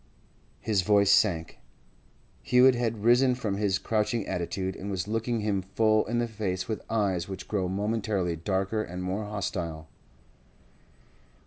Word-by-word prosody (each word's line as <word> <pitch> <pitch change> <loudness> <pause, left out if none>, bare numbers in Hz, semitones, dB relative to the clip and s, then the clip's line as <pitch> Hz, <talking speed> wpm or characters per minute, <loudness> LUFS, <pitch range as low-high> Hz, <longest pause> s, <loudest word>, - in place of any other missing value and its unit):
His 105 -4 +1
voice 100 +1 +4
sank. 85 -6 +2 0.8
Hewett 125 +1 +5
had 115 -3 -2
risen 125 +2 +4
from 105 -5 -3
his 100 -2 +1
crouching 110 +1 -1
attitude, 95 +2 -3
and 100 - -6
was 95 -1 -3
looking 115 +1 -1
him 105 -2 0
full 110 +3 +1
in 120 +2 -1
the 120 0 +1
face 95 -5 -3
with 110 -2 -3
eyes 100 -6 0
which 95 - -7
grew 95 -4 -1
momentarily 100 -3 -1
darker 95 +5 -1
and 90 -2 -6
more 95 +4 -2
hostile. 85 -6 -4
100 Hz, 140 wpm, -28 LUFS, 95-110 Hz, 0.8 s, Hewett